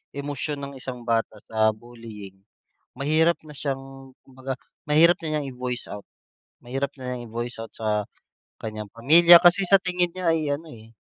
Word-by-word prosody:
emosyon 145 +1 -4
ng 140 0 -7
isang 130 -1 -7
bata 115 -2 -1
sa 110 -1 +2
bullying, 110 -3 -12 0.6
mahirap 155 +5 +2
na 150 - -11
siyang 135 -1 -6
kumbaga 130 0 -6 0.3
mahirap 165 +4 +5
na - - -1
niyang 145 -2 -4
i-voice 125 -1 -5
out. 105 -1 -8 0.6
Mahirap 135 +3 -3
na 125 -1 -5
niyang 120 -1 -6
i-voice 120 +1 -4
out 115 - -10
sa 105 -1 -1 0.6
kanyang 110 -1 -6
pamilya 170 +9 +7
kasi 180 +3 +5
sa 195 - +7
tingin 180 -2 +1
niya 185 +1 -6
ay 155 -2 -1
ano, 160 +3 -6
eh, 110 0 -16
135 Hz, 165 wpm, -24 LUFS, 115-150 Hz, 0.6 s, pamilya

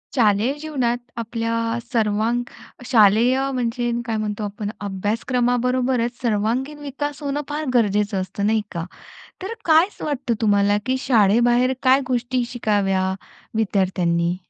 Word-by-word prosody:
शालेय 220 +2 +3
जीवनात 260 -6 -1 0.2
आपल्या 230 0 -2 0.4
सर्वांग 225 +2 +1 0.4
शालेय 235 +2 +4
म्हणजे 240 -1 -1
काय 225 -2 -2
म्हणतो 215 0 -3
आपण, 205 0 -4
अभ्यासक्रमाबरोबरच 245 +4 0
सर्वांगीण 240 +6 -1
विकास 290 +1 -5
होणं 285 +1 -1
फार 300 +1 -3
गरजेचं 205 -4 +2
असतं, 200 +2 -3
नाही 220 +1 +2
का? 170 -2 -4 0.6
तर 385 +5 -4
काय 320 +2 +5
वाटतं 275 -5 -1
तुम्हाला, 205 -1 +3
की 260 0 0
शाळेबाहेर 240 +2 +4
काय 260 +1 +5
गोष्टी 250 0 0
शिकाव्या 200 -5 0 0.5
विद्यार्थ्यांनी? 180 -5 +1
235 Hz, 115 wpm, -22 LUFS, 205-255 Hz, 0.6 s, काय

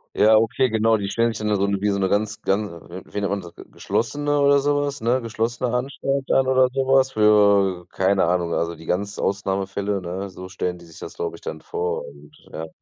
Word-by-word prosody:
Ja, 110 +1 +6
okay, 115 +4 +1
genau. 110 0 +3
Die 100 -2 -3
stellen 115 +1 +1
sich 110 - -6
dann 105 - +2
so 100 0 +1
wie 100 +1 0
so 100 - 0
'ne 95 - +1
ganz, 105 +2 -1
ganz, 100 +1 0 0.2
äh 90 +2 -8
wie 105 - -5
nennt 100 - 0
man 100 0 -1
das, 85 -1 -12
ge - - -12
geschlossene 145 +5 -1
oder 140 0 +5
so 145 +1 +1
was, 145 -1 -3
ne, 120 +3 +2
geschlossene 115 +1 -2
Anstalt 135 +2 -2
dann 135 - +3
oder 130 -1 +4
so 135 -1 -1
was 135 0 +4
für 100 -4 +4
keine 95 +1 +2
Ahnung, 85 -1 0
also, 85 0 -1
die 80 0 -14
ganz 100 +3 -2
Ausnahmefälle, 100 0 -1
ne? 95 +3 -5
So 90 0 -9
stellen 90 -1 -3
die 85 - -15
sich 80 - -15
das, - - -8
glaube 440 -2 -4
ich, - - -19
dann - - -6
vor 455 +2 -3
und, 155 - -15 0.2
ja. 80 +1 -6
105 Hz, 230 wpm, -22 LUFS, 95-130 Hz, 0.2 s, Ja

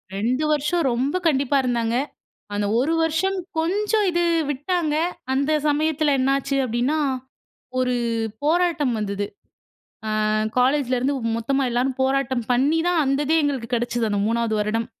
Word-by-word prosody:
2 245 +8 0
வருஷம் 300 +3 +1
ரொம்ப 265 +7 -1
கண்டிப்பா 280 -1 +2
இருந்தாங்க. 235 -2 0 0.6
அந்த 205 0 -1
1 305 +6 +1
வருஷம், 325 +5 +1 0.2
கொஞ்சம் 415 +5 +1
இது 345 0 +1 0.3
விட்டாங்க, 300 +2 -1 0.4
அந்த 280 +3 +1 0.2
சமயத்தில 305 0 +1
என்ன 260 +1 +2
ஆச்சு 275 0 -2
அப்டின்னா, 250 +6 0 0.8
ஒரு 250 -1 +1 0.5
போராட்டம் 320 -5 +2
வந்தது. 205 -1 -2 1.0
அ - - +1 0.3
காலேஜில 260 0 +2
இருந்து 275 +3 0 0.2
மொத்தமா 270 +4 0
எல்லோரும் 255 +2 0
போராட்டம் 265 -3 0
பண்ணிதான், 320 +6 +2
அந்ததே 290 +4 +1
எங்களுக்கு 265 -5 -2
கிடைச்சது 240 -1 -1
அந்த 200 -1 0
3ஆவது 230 -1 0
வருடம். 225 +2 -1
275 Hz, 130 wpm, -23 LUFS, 240-310 Hz, 1.0 s, கண்டிப்பா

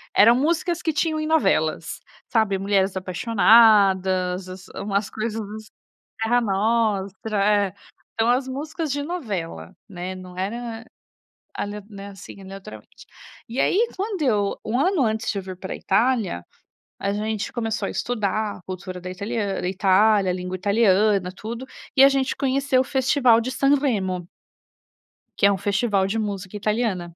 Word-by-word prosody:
eram 230 +3 +7
músicas 335 +5 0
que 320 - -1
tinham 315 +1 0
em 310 - -2
novelas, 320 0 +1 0.3
sabe. 220 -4 +2
"Mulheres 195 0 +1
Apaixonadas", 190 -2 +4
as 185 0 -10
umas 200 0 -1
coisas 220 0 -3
ass 215 +1 -8 0.6
"Terra 240 +2 +3
Nostra", 205 -1 0
é. 205 -2 +2 0.4
Então, 225 +1 +1
as 255 +2 +2
músicas 300 +2 -4
de 285 0 -2
novela, 195 - -5 0.2
né, 185 -1 -6
não 185 -1 -11
era 225 +4 -4 0.7
ale 205 0 -4 0.4
assim, 195 0 -12
aleatoriamente. 190 - -11 0.4
E, 235 +4 -4
aí, 455 +5 +3
quando 395 -2 -3
eu 210 -7 +1
1 235 +4 0
ano 360 0 +2
antes 220 -1 -1
de 200 - -5
eu 195 - -3
vir 185 -1 -8
para 190 +1 -6
a - - -5
Itália, 215 - 0 0.5
a 200 - -1
gente 215 +1 -3
começou 225 -2 -2
a - - -4
estudar 215 -3 -2
a - - -16
cultura 185 -1 -6
da 180 - -6
italian 200 +1 -3
da 180 - -2
Itália, 195 0 +3
a - - -1
língua 180 0 -4
italiana, 200 -1 +3
tudo, 235 +6 -6 0.3
e 270 - +7
a 275 - +9
gente 270 -1 0
conheceu 270 -1 +2
o - - 0
festival 260 -3 +3
de 250 +3 -3
Sanremo. 240 -11 +1 1.1
Que 200 - +4
é - - +4
um 195 - 0
festival 200 0 +1
de 215 +3 -1
música 200 -2 -4
italiana. 205 -5 -1
210 Hz, 155 wpm, -23 LUFS, 190-245 Hz, 1.1 s, a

